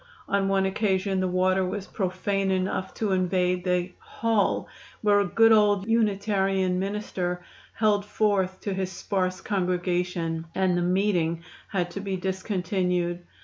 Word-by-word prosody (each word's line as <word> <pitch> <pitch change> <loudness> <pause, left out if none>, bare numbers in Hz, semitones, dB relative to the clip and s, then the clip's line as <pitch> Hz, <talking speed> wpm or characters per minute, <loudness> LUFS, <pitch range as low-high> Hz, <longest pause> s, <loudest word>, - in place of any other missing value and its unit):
On 200 -1 +1
one 195 0 +2
occasion 190 -1 0
the 185 - +1
water 185 +1 +2
was 190 +2 -3
profane 195 0 -1
enough 190 0 -1
to 215 -3 -1
invade 180 -1 +1
the 180 0 0
"Hall" 225 -2 0 0.3
where 205 -1 +4
a 200 - +2
good 225 +5 +5
old 205 -2 +4
Unitarian 195 -4 +1
minister 185 -3 -3 0.3
held 210 -2 +2
forth 200 -3 0
to 200 - -2
his 190 -1 -2
sparse 185 0 -2
congregation, 180 -3 -1
and 190 -2 +2
the 175 - +1
"meeting" 175 -3 +1 0.2
had 180 -3 -2
to - - -5
be 195 -1 -3
discontinued. 180 -2 -1
190 Hz, 140 wpm, -26 LUFS, 180-200 Hz, 0.3 s, good